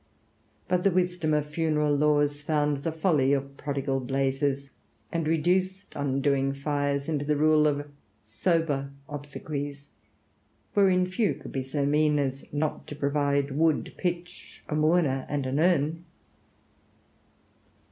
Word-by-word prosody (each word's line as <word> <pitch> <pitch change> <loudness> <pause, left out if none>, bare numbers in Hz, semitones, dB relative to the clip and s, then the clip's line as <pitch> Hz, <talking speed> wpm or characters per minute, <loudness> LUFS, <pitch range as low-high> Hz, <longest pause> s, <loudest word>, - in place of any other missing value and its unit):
But 180 -1 +1
the 195 - +5
wisdom 180 -3 0
of 150 -1 +1
funeral 150 -1 +1
laws 145 0 +2
found 150 -1 +1
the 145 +4 -3
folly 155 -4 +2
of 140 0 -2
prodigal 140 -2 -2
blazes, 135 +1 -1 0.4
and 165 -2 -1
reduced 185 +4 0
undoing 135 -1 +1
fires 140 0 -1
into 150 -3 -1
the 150 +1 +1
rule 155 +1 +4
of 145 0 -1 0.3
sober 140 - 0 0.2
obsequies, 145 0 -6 0.8
wherein 190 -3 +4
few 185 +3 0
could - - -10
be 135 - -2
so 140 +2 -2
mean 150 +1 +3
as 135 -1 -3
not 150 +1 -2
to 150 - -7
provide 140 -1 0
wood, 155 +2 +1
pitch, 175 0 -5
a - - -4
mourner, 155 -3 +2
and 145 -2 -1
an 130 +3 -1
urn.... 165 -1 +2
145 Hz, 130 wpm, -27 LUFS, 140-160 Hz, 0.8 s, the